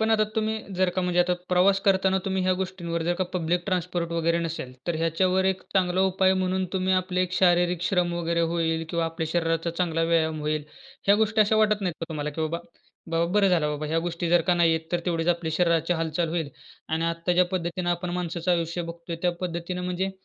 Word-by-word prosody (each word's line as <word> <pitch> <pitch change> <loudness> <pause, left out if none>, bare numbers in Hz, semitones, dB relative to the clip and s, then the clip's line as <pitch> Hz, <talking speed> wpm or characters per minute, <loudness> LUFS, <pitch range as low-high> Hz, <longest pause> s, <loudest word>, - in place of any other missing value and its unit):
पण 220 0 +1
आता 215 -1 +4
तुम्ही 220 0 0 0.2
जर 185 0 +2
का 185 - +1
म्हणजे 180 0 +2
आता 180 0 +2
प्रवास 190 +2 +4
करताना 190 -1 +3
तुम्ही 190 -1 0
ह्या 185 0 +2
गोष्टींवर 175 -3 -3
जर 175 +1 +1
का 185 +1 -1
पब्लिक 175 0 0
ट्रान्सपोर्ट 180 -2 -1
वगैरे 170 0 +1
नसेल, 165 -6 -4
तर 170 -2 0
ह्याच्यावर 180 +4 +1
एक 190 -1 0
चांगला 185 -1 +2
उपाय 190 0 +3
म्हणून 185 0 0
तुम्ही 190 0 +1
आपले 185 0 0
एक 180 -1 -3
शारीरिक 175 -1 +3
श्रम 180 -2 +1
वगैरे 170 0 0
होईल 165 -1 0
किंवा 170 -1 0
आपल्या 165 0 -3
शरीराचा 165 -1 0
चांगला 165 -1 -1
व्यायाम 160 -2 +1
होईल. 150 0 -1 0.4
ह्या 200 - +6
गोष्टी 220 0 +2
अशा 215 +1 +4
वाटत 215 -1 +3
नाहीत 180 -4 -2
का - - -1
तुम्हाला 150 -2 -3
की 150 - -6
बाबा, 160 +1 -1 0.5
बाबा 165 0 +2
बरं 205 -1 +4
झालं 165 -5 +2
बाबा, 150 +1 -3
ह्या 160 +2 0
गोष्टी 170 0 -3
जर 175 0 +5
का 180 - +5
नाही 170 -1 +4
आहेत 160 0 -4
तर 175 - +1
तेवढीच 165 -1 0
आपल्या 170 -2 0
शरीराची 170 -1 +2
हालचाल 165 0 -1
होईल. 160 -3 -2 0.4
आणि 160 +1 0
आत्ता 165 +1 -1
ज्या 180 +1 +4
पद्धतीनं 175 0 -1
आपण 175 +1 -2
माणसाचं 175 0 -2
आयुष्य 170 0 -1
बघतोय 170 0 -7
त्या 180 -1 +2
पद्धतीनं 180 0 -4
म्हणजे, 180 +2 -1
175 Hz, 215 wpm, -26 LUFS, 165-185 Hz, 0.5 s, ह्या